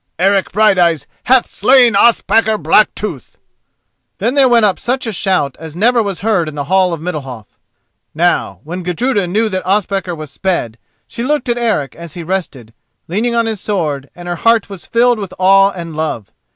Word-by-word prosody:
Eric 195 +2 +1
Brighteyes 185 -6 +2 0.2
hath 255 0 +4
slain 245 +2 +4
Ospakar 220 0 +3
Blacktooth!" 165 - 0 0.8
Then 230 +6 -1
there 275 -2 +4
went 235 -2 +4
up 195 -3 0
such 255 +2 -2
a 225 - -3
shout 175 -8 0
as 160 -1 -9
never 235 +6 +3
was 200 -4 -4
heard 200 -7 0
in 150 - -10
the 145 - -3
hall 185 +3 +2
of 165 - -4
Middalhof. 135 - -6 0.7
Now 175 +2 0
when 175 +4 -6
Gudruda 195 +3 -1
knew 215 +5 0
that 185 -2 -3
Ospakar 195 -2 -1
was 155 -3 -9
sped, 140 - -2 0.3
she 235 - -8
looked 280 0 -1
at 240 - +1
Eric 205 - -1
as 170 -2 -10
he 175 - -6
rested, 160 - -4 0.3
leaning 225 +7 -1
on 230 0 +2
his 220 -3 -4
sword, 150 -9 -2
and 175 0 -10
her 175 0 -3
heart 230 -1 +2
was 195 -3 -9
filled 240 0 +2
with 195 -3 -7
awe 195 +1 +5
and 170 -5 -8
love. 155 -9 -4
190 Hz, 180 wpm, -15 LUFS, 165-225 Hz, 0.8 s, awe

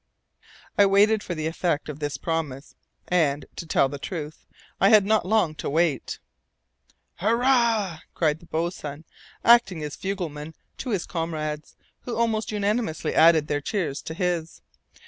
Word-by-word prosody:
I 200 - +7
waited 205 +2 +4
for 175 - -5
the 155 -1 -3
effect 160 -2 -1
of 150 -1 -6
this 145 -2 -3
promise, 155 -4 -3 0.3
and, 150 -5 +1
to 165 - -7
tell 140 - +3
the 140 +1 -7
truth, 155 0 -6 0.3
I 195 - +5
had 215 -3 +6
not 215 -1 +3 0.4
to - - -2
wait 160 0 0 1.0
long. 215 +5 +2
"Hurrah!" 235 -8 +2 0.2
cried 155 -2 +1
the 170 - -17
boatswain, 160 -2 -4 0.4
acting 235 -9 +5
as 150 -1 -5
fugleman 160 -6 -5 0.2
to 260 - -4
his 200 -7 -1
comrades, 155 -3 -4 0.2
who 245 - -5
almost 225 -2 0
unanimously 210 -4 -1
added 160 -1 +6
their 145 -1 -1
cheers 165 -5 -2
to 160 - -7
his. 170 -3 -2
170 Hz, 145 wpm, -25 LUFS, 155-205 Hz, 1.0 s, I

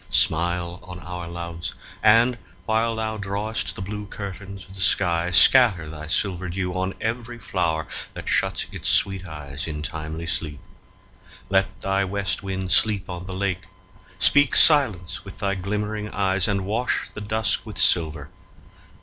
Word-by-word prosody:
Smile 85 +1 +1
on 90 -3 -10
our 90 0 -7
loves; 85 0 -6 0.3
and, 115 +3 +4 0.3
while 115 +2 0
thou 110 -1 -3
drawest 100 +2 -4
the 95 - -7
Blue 105 +1 -7
curtains 100 -2 -8
of 95 - -15
the 95 - -8
sky, 85 -2 +2
scatter 95 -2 +6
thy 75 0 -9
silver 90 +1 +1
dew 90 0 -4
On 95 +1 -3
every 120 +1 -4
flower 85 -7 -2 0.3
that - - -9
shuts - - +1
its - - -3
sweet 95 -1 +2
eyes 75 -3 -6
In 75 -2 -6
timely 80 +1 -6
sleep. 75 -3 -2 0.9
Let 95 0 0
thy 95 0 0
West 100 -1 -2
Wind 95 -1 -5
sleep 100 -2 +3
on 90 +1 -8
The 95 - -6
lake; 95 -2 -3 0.5
speak 145 +8 +3
silence 100 - +6
with 95 - -11
thy 100 0 -1
glimmering 105 +2 -4
eyes, 95 -2 0
And 100 -2 -2
wash 115 +5 -1
the 105 - -8
dusk 110 0 +2
with - - -10
silver. 80 -3 +3
95 Hz, 155 wpm, -23 LUFS, 85-105 Hz, 0.9 s, scatter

